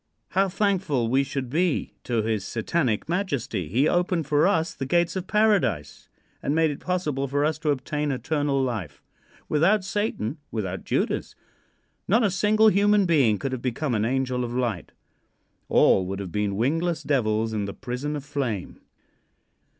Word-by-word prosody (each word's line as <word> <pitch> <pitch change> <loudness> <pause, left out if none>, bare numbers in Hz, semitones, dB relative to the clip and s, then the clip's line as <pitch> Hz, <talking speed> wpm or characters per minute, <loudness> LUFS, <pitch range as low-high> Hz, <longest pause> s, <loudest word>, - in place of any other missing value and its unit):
How 195 +1 +2
thankful 180 - 0
we 135 +3 +3
should 135 -1 -4
be 165 +5 0
to 115 -3 0
his 110 -3 -1
Satanic 115 +2 -1
Majesty. 145 - -2
He 130 +9 +2
opened 175 -2 +1
for 150 +4 +3
us 165 -1 +1
the 135 - -5
gates 170 +3 +2
of 185 -1 -4
Paradise 165 - +1 0.3
and 145 - -1
made 160 -1 +3
it 145 - -7
possible 155 -7 -1
for 145 +2 +1
us 155 0 -1
to 155 -1 -1
obtain 145 +2 -1
eternal 140 +2 0
life. 105 - -4 0.4
Without 185 +7 +3
Satan, 195 - -2
without 95 -4 -4
Judas, - - -1 0.7
not 225 +5 +3
a 205 - +2
single 215 +3 +4
human 205 0 +3
being 135 - +3
could 135 +3 -3
have 130 -2 -4
become 130 +2 -2
an 105 -2 +1
angel 125 +1 0
of 120 0 -4
light. 120 -8 -2 0.8
All 95 -1 +4
would 95 +1 -3
have 95 -3 -6
been 105 0 -1
wingless 165 +8 0
devils 110 -5 0
in 105 -2 -1
the 100 - -5
prison 130 +4 -4
of 145 -2 -6
flame. 135 -10 -3
140 Hz, 165 wpm, -25 LUFS, 115-175 Hz, 0.8 s, single